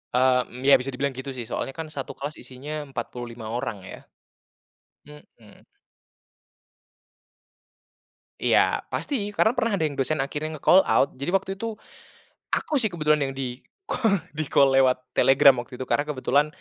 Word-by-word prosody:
E - - +4
mmm, 125 -1 +1
ya 140 - +9
bisa 130 +2 -4
dibilang 135 +1 -2
gitu 130 +2 -6
sih, 125 -3 -6
soalnya 135 - -3
kan 160 - -4
1 140 -4 -6
kelas 145 +2 -5
isinya 130 +4 -8 0.2
45 120 -3 -6
orang 120 -3 -3
ya. - - -8 1.1
Mhm. 150 0 -17 2.8
Iya, - - +3
pasti, 290 - -3 0.2
karena 220 - +4
pernah 230 -3 +1
ada 185 - -1
yang 145 -3 -2
dosen 140 +2 0
akhirnya 150 +3 -4
nge-call 180 +6 +5
out. - - +3
Jadi 140 - -3
waktu 195 0 +1
itu, 225 0 -4 0.8
aku 310 - -1
sih 220 -3 +2
kebetulan 150 -3 +1
yang - - -8
di-call, 200 - -2 0.2
di-call 145 -2 +3
lewat 130 -1 +4 0.2
Telegram 135 +1 +6
waktu 125 +1 -12
itu. 130 - -4
Karena 145 - +1
kebetulan, 145 +1 +2
140 Hz, 150 wpm, -25 LUFS, 130-155 Hz, 2.8 s, ya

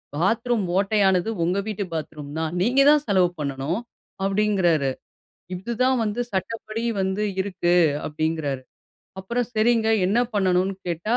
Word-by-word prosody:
"Bathroom 225 +7 +1
ஓட்டையானது, 195 -1 +2
உங்க 180 +3 +1
வீட்டு 210 -1 -2
bathroom 150 -2 -6
தான். 160 0 -2
நீங்க 250 +7 +3
தான் 300 -1 +5
செலவு 185 -4 +3
பண்ணணும்", 140 +6 -2 0.5
அப்டிங்றாரு. 190 -8 +2 0.6
இது 195 +7 -5
தான் 255 0 +3
வந்து 210 +3 -2
சட்டப்படி 215 +3 -3 0.2
வந்து 190 +2 -1 0.2
இருக்கு, 185 -2 0 0.3
அப்படிங்றாரு. 150 -3 -2 0.6
அப்பறம், 235 +5 -2
"சரிங்க, 225 0 +3 0.2
என்ன 210 +5 +2 0.2
பண்ணணும்னு?" 190 -1 +2
கேட்டா, 175 +8 0
190 Hz, 125 wpm, -24 LUFS, 170-220 Hz, 0.6 s, தான்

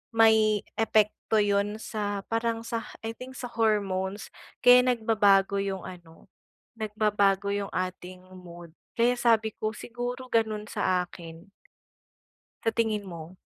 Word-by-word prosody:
may 220 -2 +5 0.2
epekto 215 0 +2
'yon 205 0 0
sa 205 -2 -3
parang 230 0 0
sa, 230 0 -4 0.2
I 225 - -3
think, 260 +1 -9
sa 245 - -6
hormones. 205 -3 -1 0.3
Kaya 250 0 +9 0.2
nagbabago 205 -3 +3
yung 195 -1 -3
ano, 170 -3 -12 0.5
nagbabago 205 -2 +1
yung 200 0 -3
ating 185 0 -5
mood. 175 -2 -12 0.2
Kaya 240 +1 +2
sabi 220 -2 +3
ko, 215 +1 -4
siguro 245 +3 -6
gano'n 220 -2 +1
sa 180 -1 +1
akin. 170 +1 -12 1.2
Sa 225 - +3
tingin 220 -2 0
mo? 170 -1 -9
210 Hz, 125 wpm, -27 LUFS, 190-225 Hz, 1.2 s, Kaya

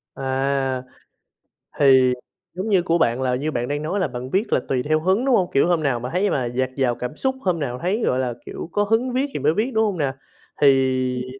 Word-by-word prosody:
À! 135 -1 -1 1.0
Thì 130 -3 +5 0.4
giống 190 +5 -4
như 190 -4 +4
của 170 -1 +1
bạn 120 -5 +1
là 125 -1 +1
như 145 +5 -2
bạn 120 -3 -2
đang 145 +2 -2
nói 185 +6 -1
là 185 - +1
bạn 125 +1 -6
viết 195 - 0
là - - +4
tùy 125 -2 0
theo 155 +1 +1
hứng, 190 +9 +1
đúng 265 -3 +4
hông? 185 -5 +1
Kiểu, 140 - +3
hôm 175 -3 +1
nào 135 -5 +1
mà 125 +2 -5
thấy 195 +3 +2
mà 130 - 0
dạt 125 +2 -1
dào 130 -3 +1
cảm 125 +4 -5
xúc, 265 0 -1
hôm 180 -6 0
nào 125 -4 -3
thấy, 200 +6 0
gọi 125 - +1
là, 125 -2 -1
kiểu, - - -7
có 205 - +1
hứng 225 +4 0
viết 260 +2 +1
thì - - -3
mới 150 +3 +2
viết, 225 +8 -1
đúng 220 0 +3
hông 205 -4 -1
nè? 140 -4 -1 0.5
Thì 130 -2 +2
140 Hz, 240 wpm, -22 LUFS, 130-185 Hz, 1.0 s, Thì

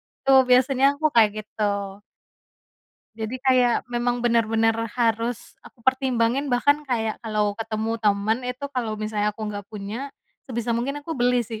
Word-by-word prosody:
itu 270 - -6 0.2
biasanya 260 +1 +4
aku 310 +2 -4
kayak 215 -3 +6
gitu. 215 0 -8 1.6
Jadi 240 +4 -5
kayak 255 -2 +3
memang 240 0 -1
bener-bener 225 -1 +2 0.2
harus 230 0 -1
aku 230 - -18
pertimbangin 260 0 +1
bahkan 285 +4 +2
kayak 225 -4 -1
kalau 210 -2 -1
ketemu 225 0 -2
temen 210 +2 +1
itu 250 +2 -5
kalau 235 -5 -2
misalnya 210 -1 -2
aku 215 -1 -5
gak 205 -1 -7
punya, 220 +6 -7 0.3
sebisa 235 -2 -3
mungkin 275 +5 -2
aku 325 - -9
beli 245 0 +3
sih. 220 -1 -7
235 Hz, 145 wpm, -24 LUFS, 220-255 Hz, 1.6 s, kayak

